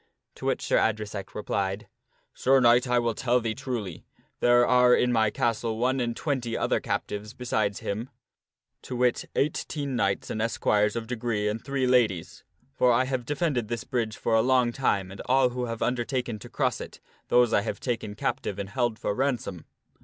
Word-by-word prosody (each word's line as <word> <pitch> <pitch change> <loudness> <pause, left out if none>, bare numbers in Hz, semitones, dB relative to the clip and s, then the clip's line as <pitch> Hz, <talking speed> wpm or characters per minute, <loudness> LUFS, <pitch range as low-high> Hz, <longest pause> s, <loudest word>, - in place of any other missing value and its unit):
To - - -6
which - - 0
Sir - - +2
Adresack 105 -2 -2
replied, 100 -1 -2 0.3
" - - -40
Sir 135 +1 +3
Knight, 120 +1 +5
I 125 0 +2
will 120 -1 +1
tell 125 +2 +1
thee 115 -2 -2
truly; 110 - -5 0.4
there 120 0 +5
are 125 0 +5
in 125 - +2
my 110 -2 +3
castle 115 -2 -1
one 130 +3 +1
and 120 -1 -2
twenty 130 -6 -2
other - - +1
captives 105 +3 -4
besides 110 -5 -1
him: 110 +5 -4 0.7
to 125 - -6
wit, 125 -1 +1
eighteen 140 -1 -1
knights 100 -4 0
and 110 - -2
esquires 105 -2 +1
of 115 -1 -3
degree 110 -3 -2
and 105 +2 -3
three 135 -1 -1
ladies. 105 -9 +1 0.3
For 125 - +3
I 120 +2 +3
have 130 -2 -2
defended 145 -6 0
this 115 0 -3
bridge 115 -4 -2
for 115 - -1
a 110 - +5
long 125 -1 +3
time 100 -7 0
and 100 - -8
all 130 0 +4
who 125 0 -3
have 115 -1 -3
undertaken 125 -2 -1
to - - -11
cross - - -1
it, - - -9 0.3
those 120 -2 +4
have 105 +1 0
I - - -22
taken 115 -4 -3
captive 100 -1 -2
and 100 -1 -5
held 120 -1 -1
for 105 - -2
ransom. 120 - -2
120 Hz, 190 wpm, -27 LUFS, 105-125 Hz, 0.7 s, Knight